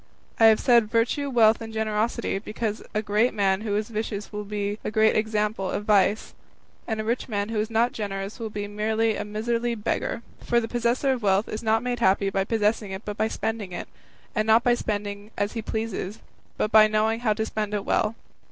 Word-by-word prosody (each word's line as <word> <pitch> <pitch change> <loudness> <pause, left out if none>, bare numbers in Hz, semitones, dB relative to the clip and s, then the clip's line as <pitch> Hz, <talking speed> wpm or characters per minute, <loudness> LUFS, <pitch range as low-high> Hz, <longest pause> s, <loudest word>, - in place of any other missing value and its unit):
I 225 - +7
have 220 -1 +7
said 235 -4 +4
virtue, 240 +5 +1
wealth, 225 -3 +4
and 225 0 -6
generosity, 220 -1 -1
because 215 +1 -4
a 215 - -1
great 215 +3 +1
man 195 -1 +2
who 210 -2 -2
is 210 +1 -1
vicious 210 -2 -4
will 210 0 -4
be 205 0 -3
a - - -2
great 220 +1 +3
example 210 -2 0
of 205 - -3
vice, 205 0 +2 0.5
and 220 -1 -2
a - - -1
rich 235 +3 -2
man 205 -1 -1
who 225 -1 -1
is 215 +1 -1
not 230 +2 +2
generous 200 0 -5
will 225 -1 -4
be 205 -1 -4
merely 220 +2 0
a - - -3
miserly 230 +3 -1
beggar; 220 +2 -2 0.2
for 240 - +2
the 225 - -3
possessor 240 +3 +1
of 255 -2 -1
wealth 200 0 +2
is 215 - -5
not 225 0 +1
made 245 -1 -2
happy 195 -2 +3
by 195 0 +1
possessing 215 -1 0
it, 190 +2 -7
but 210 - -4
by 220 - +1
spending 220 -4 -3
it, - - -5 0.5
and 215 0 0
not 225 +2 +5
by 245 - +4
spending 205 -2 -3
as 205 0 0
he 230 - -3
pleases, 220 -2 -4 0.4
but 215 - 0
by 215 0 +8
knowing 215 +1 +1
how 225 -3 +2
to 220 +1 -2
spend 215 -1 -3
it 205 - -3
well. 215 +1 +1
215 Hz, 215 wpm, -25 LUFS, 205-225 Hz, 0.5 s, by